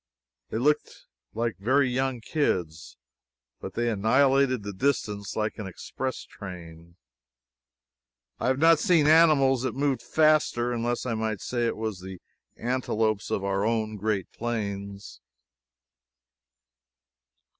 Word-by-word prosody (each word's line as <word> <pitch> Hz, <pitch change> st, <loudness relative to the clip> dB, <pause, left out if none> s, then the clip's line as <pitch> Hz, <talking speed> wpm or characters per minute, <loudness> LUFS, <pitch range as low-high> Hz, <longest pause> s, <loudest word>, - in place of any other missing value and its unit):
They -, -, -3 dB
looked 145 Hz, +5 st, 0 dB, 0.3 s
like 115 Hz, 0 st, -1 dB
very 130 Hz, +7 st, +3 dB
young 130 Hz, -1 st, -1 dB
kids, 90 Hz, -, -2 dB, 0.6 s
but -, -, -8 dB
they 120 Hz, 0 st, 0 dB
annihilated 130 Hz, +3 st, +3 dB, 0.2 s
distance 105 Hz, -7 st, -1 dB
like 110 Hz, +1 st, -2 dB
an 105 Hz, -, -5 dB
express 130 Hz, +8 st, -5 dB
train. 85 Hz, -3 st, -11 dB, 1.4 s
I -, -, -1 dB
have 130 Hz, 0 st, +2 dB
not 165 Hz, +1 st, +5 dB
seen 170 Hz, -6 st, +3 dB
animals 150 Hz, -5 st, +5 dB
that 130 Hz, -, -2 dB
moved 140 Hz, -1 st, 0 dB
faster, 155 Hz, -6 st, +2 dB
unless 120 Hz, +1 st, -2 dB
I 120 Hz, -, -1 dB
might 110 Hz, -2 st, -2 dB
say 120 Hz, -1 st, -1 dB
it -, -, -2 dB
of 110 Hz, -3 st, -3 dB
the 95 Hz, 0 st, -8 dB, 0.4 s
antelopes 110 Hz, -4 st, -1 dB
of 100 Hz, -, -1 dB
our 100 Hz, 0 st, 0 dB
own 110 Hz, -1 st, 0 dB
great 105 Hz, -2 st, -2 dB
plains. 100 Hz, -, -5 dB
115 Hz, 120 wpm, -26 LUFS, 100-135 Hz, 1.4 s, not